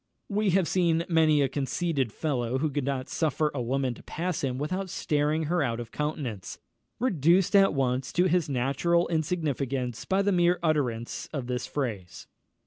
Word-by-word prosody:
We 210 0 +1
have 185 -4 +1
seen 170 -2 +2
many 160 -4 +4
a - - +2
conceited 135 -1 -1
fellow 130 -3 -1
who 150 +2 0
could 140 -1 -2
not 135 -2 -2
suffer 155 -1 0
a 135 - -2
woman 130 +1 0
to - - -13
pass 175 0 -3
him 130 -2 -1
without 185 +7 -3
staring 150 0 0
her 175 +3 0
out 120 -4 -1
of 115 -2 -7
countenance, 145 - -4 0.4
reduced 185 - +3
at 195 -5 +5
once 130 -1 0
into 180 +1 +3
his 170 -3 +1
natural 140 +7 +1
insignificance 140 -7 -2
by 195 +1 +1
the 200 - +2
mere 175 -1 +3
utterance 130 -8 -1
of 140 -5 -3
this 125 0 -3
phrase. 110 -11 -4
150 Hz, 170 wpm, -27 LUFS, 130-170 Hz, 0.4 s, at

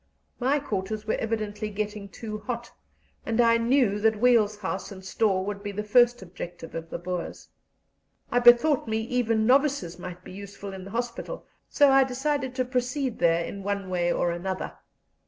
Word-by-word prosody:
My 265 +4 +2
quarters 215 -5 -3
were 220 - 0
evidently 215 -1 -2
getting 210 -1 -4
too 215 +1 -6
hot, 235 +2 -5 0.5
and 230 0 -2
I 230 -1 +5
knew 230 -3 +2
that 220 0 +2
Weil's 225 -3 +4
house 190 -1 -4
and 190 -1 -10
store 190 -2 +1
would 200 0 -4
be 205 - -4
the 210 +1 -4
first 240 +1 +4
objective 175 -2 -8
of 165 0 -6
the - - -4
Boers. 175 0 -5 0.8
I 245 - +3
bethought 240 +3 +6
me 220 0 0
even 225 -2 +1
novices 260 - +2
might 180 0 -8
be - - -11
useful 200 0 -8
in 190 -1 -8
the - - -8
hospital, 240 - -4 0.2
so 285 -2 +5
I 270 0 +6
decided 265 0 -2
to 255 -1 0
proceed 250 0 -1
there 170 0 +3
in 200 - -6
one 200 -1 -3
way 175 -1 +1
or 175 - +1
another. 185 +2 -4
215 Hz, 175 wpm, -26 LUFS, 190-245 Hz, 0.8 s, bethought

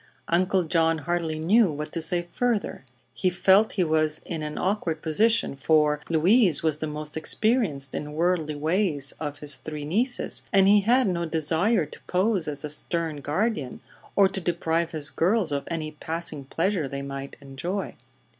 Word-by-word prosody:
Uncle 185 +2 +2
John 165 0 +2
hardly 165 0 -2
knew 190 +5 +3
what 150 +1 -5
to 165 - -3
say 175 +2 +1
further. 235 - -1 0.3
He 185 - 0
felt 190 +4 +3
he 190 - +1
was 155 -1 +1
in 165 -3 -5
an 150 0 -5
awkward 180 -5 -2
position, 215 +3 +2
for 150 +1 +2
Louise 175 - +4
was 155 -2 +1
the 155 - -2
most 150 0 -6
experienced 160 - +1
in 150 0 -5
worldly 160 -2 0
ways 155 -2 0
of 145 -2 -5
his 145 -2 -3
three 150 +2 -7
nieces 235 - +1
and 195 -1 +5
he 205 +1 +6
had 245 +4 +3
no 170 -2 -1
desire 165 +5 +1
to 150 - -13
pose 185 -2 +1
as 145 0 -2
a - - -5
stern 165 0 -1
guardian 150 - -2 0.4
or 200 -1 +6
to 190 0 -5
deprive 170 -1 -1
his 155 -4 -1
girls 185 0 +1
of 140 -1 -2
any 160 -2 -3
passing 160 -2 -5
pleasure 165 +2 -1
they 140 +1 -5
might 140 0 -7
enjoy. 160 +8 -5
165 Hz, 170 wpm, -25 LUFS, 150-190 Hz, 0.4 s, he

